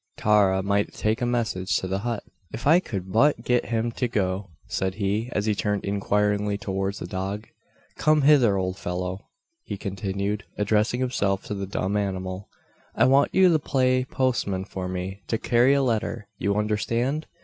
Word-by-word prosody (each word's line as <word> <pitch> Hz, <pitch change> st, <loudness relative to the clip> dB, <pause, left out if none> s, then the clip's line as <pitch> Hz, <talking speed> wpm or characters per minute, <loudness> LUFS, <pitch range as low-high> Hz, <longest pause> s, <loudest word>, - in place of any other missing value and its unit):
Tara 100 Hz, -3 st, +3 dB
might 100 Hz, +1 st, 0 dB
take 110 Hz, +2 st, 0 dB
a 120 Hz, -, +1 dB
message 110 Hz, -6 st, 0 dB
to 95 Hz, -, -3 dB
the 95 Hz, +1 st, -1 dB
hut! 115 Hz, 0 st, -3 dB, 0.3 s
"If 120 Hz, -, -7 dB
I 160 Hz, +5 st, +6 dB
could 95 Hz, -, -5 dB
but 115 Hz, +3 st, +3 dB
get 125 Hz, -1 st, +1 dB
him 115 Hz, 0 st, -1 dB
to 125 Hz, +2 st, -1 dB
go," 95 Hz, -3 st, -1 dB, 0.2 s
said 95 Hz, 0 st, -2 dB
he, 105 Hz, +3 st, -1 dB
as 105 Hz, -, -1 dB
he 110 Hz, -, +2 dB
turned 105 Hz, -1 st, -1 dB
inquiringly 105 Hz, +1 st, 0 dB
towards 95 Hz, -1 st, -2 dB
the -, -, -6 dB
dog. 95 Hz, +4 st, -4 dB, 0.5 s
"Come 155 Hz, -1 st, +3 dB
hither, 130 Hz, -9 st, +5 dB
old 95 Hz, 0 st, -2 dB
fellow!" 90 Hz, +1 st, -4 dB, 0.4 s
he 100 Hz, -, -5 dB
continued, 100 Hz, +1 st, -3 dB
addressing 105 Hz, +4 st, +1 dB
himself 100 Hz, -7 st, 0 dB
to -, -, -5 dB
the 100 Hz, -1 st, -4 dB
dumb 100 Hz, 0 st, -2 dB
animal; 95 Hz, -1 st, -3 dB, 0.5 s
"I -, -, +4 dB
want 135 Hz, +2 st, +4 dB
you 190 Hz, -1 st, +6 dB
to 160 Hz, -2 st, +3 dB
play 130 Hz, -3 st, +2 dB
postman 120 Hz, -8 st, -1 dB
for 95 Hz, -2 st, -5 dB
me 95 Hz, +2 st, -5 dB
to 115 Hz, -, 0 dB
carry 120 Hz, +5 st, +3 dB
a 140 Hz, -, +2 dB
letter. 110 Hz, -4 st, -1 dB
You 100 Hz, 0 st, 0 dB
understand? 115 Hz, +7 st, 0 dB
105 Hz, 175 wpm, -25 LUFS, 95-120 Hz, 0.5 s, I